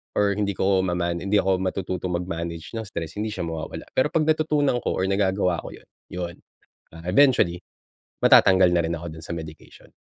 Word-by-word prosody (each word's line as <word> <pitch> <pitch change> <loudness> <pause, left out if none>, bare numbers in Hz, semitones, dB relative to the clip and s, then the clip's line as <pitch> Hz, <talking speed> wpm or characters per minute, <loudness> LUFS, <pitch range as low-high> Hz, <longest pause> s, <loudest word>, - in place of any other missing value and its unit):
or 100 -1 +3
hindi 100 -2 -1
ko 95 +1 +2
maman 85 -2 -1
hindi 100 +3 -1
ako 95 -2 +2
matututo 95 -1 -3
mag-manage 85 -2 -4
ng 110 - -6
stress, 85 0 -6
hindi 110 - -1
siya 95 -4 -4
mawawala. 80 -1 -5
Pero, 130 - +3
'pag 160 - +2
natutunan 150 -4 +2
ko - - 0
or - - -1
nagagawa 95 -3 +1
ko - - -8
'yon, - - -19 0.2
yon, 90 -1 -5 0.6
ah 80 +1 -11
eventually, 90 -5 +3 0.6
matatanggal 95 -1 +6
na 85 - +3
rin 80 - -1
ako 80 0 -7
dun 80 - -10
sa 85 - -6
medication. 80 -1 -11
90 Hz, 185 wpm, -24 LUFS, 85-100 Hz, 0.6 s, matatanggal